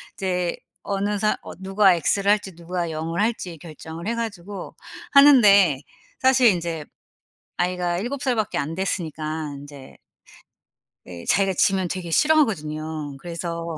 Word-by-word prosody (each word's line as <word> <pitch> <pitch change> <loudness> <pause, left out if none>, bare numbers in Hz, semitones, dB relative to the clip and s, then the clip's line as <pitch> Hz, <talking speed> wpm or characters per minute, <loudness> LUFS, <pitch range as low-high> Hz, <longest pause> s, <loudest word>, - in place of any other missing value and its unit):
이제 180 -2 -2 0.3
어느 205 +1 -1
사 215 -1 +1
어 - - -9
누가 195 -1 +4
엑스를 200 +5 +1
할지 200 -4 -1
누가 175 0 -4
영을 165 +4 -3
할지 200 -7 -2
결정을 160 +2 -9
해 230 - -1
가지고 200 -4 -6 0.4
하는데 205 - +6 0.4
사실 260 -1 +5
인제 170 -4 -2 0.7
아이가 175 -1 -1
7 255 +6 -4
살 255 -3 +1
밖에 215 -2 -1
안 155 +3 -2
됐으니까 160 -5 -3
인제 140 -1 -12 1.1
네 85 -2 -10
자기가 195 -1 +2
지면 190 -2 +2
되게 175 -1 -5
싫어하거든요. 155 - +1
그래서 170 -1 -5
180 Hz, 275 characters per minute, -23 LUFS, 160-205 Hz, 1.1 s, 하는데